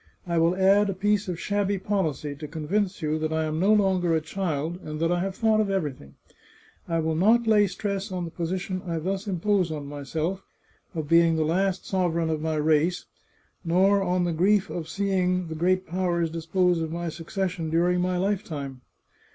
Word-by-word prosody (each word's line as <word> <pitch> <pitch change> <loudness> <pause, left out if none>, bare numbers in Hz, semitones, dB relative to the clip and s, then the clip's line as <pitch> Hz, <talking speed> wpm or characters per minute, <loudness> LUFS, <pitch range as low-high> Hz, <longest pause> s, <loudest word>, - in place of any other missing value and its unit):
I 170 -2 0
will 165 +2 +3
add 195 +2 +4
a 195 - -2
piece 205 +1 +1
of 175 -2 -3
shabby 205 -1 0
policy, 160 -8 -2
to 150 +1 -7
convince 180 +5 -2
you 155 +1 0
that 155 0 -2
I 160 0 0
am 155 0 -2
no 195 +4 +3
longer 190 -5 +3
a - - +3
child, 160 0 -3
and 155 -2 -6
that 165 +1 +1
I 175 - +1
have 190 +1 -2
thought 220 -1 +3
of 210 - -1
everything. 145 - -3 0.7
I 165 - 0
will 160 0 0
not 220 +8 +4
lay 210 -2 +4
stress 200 +1 -3
on 180 -2 -3
the 165 - -7
position 185 +3 -3
I 165 -1 -1
thus 190 +5 -3
impose 190 -1 +1
on 150 -2 -5
myself, 155 +6 -3 0.5
of 155 -2 -3
being 165 0 +5
the 160 -1 +1
last 185 +3 0
sovereign 170 -4 0
of 155 -1 -2
my 160 0 -1
race, 155 +3 +1 0.6
nor 190 +4 +3
on 180 -1 +1
the 175 -1 0
grief 190 +4 +2
of 165 -2 -5
seeing 185 -3 0
the - - -4
great 185 +3 +1
powers 170 -1 -1
dis 165 0 -6
pose 180 -1 +2
of 160 -1 -3
my 170 +1 -3
succession 170 0 -3
during 175 +2 +2
my 180 0 0
lifetime. 165 -9 -3
175 Hz, 195 wpm, -26 LUFS, 160-195 Hz, 0.7 s, being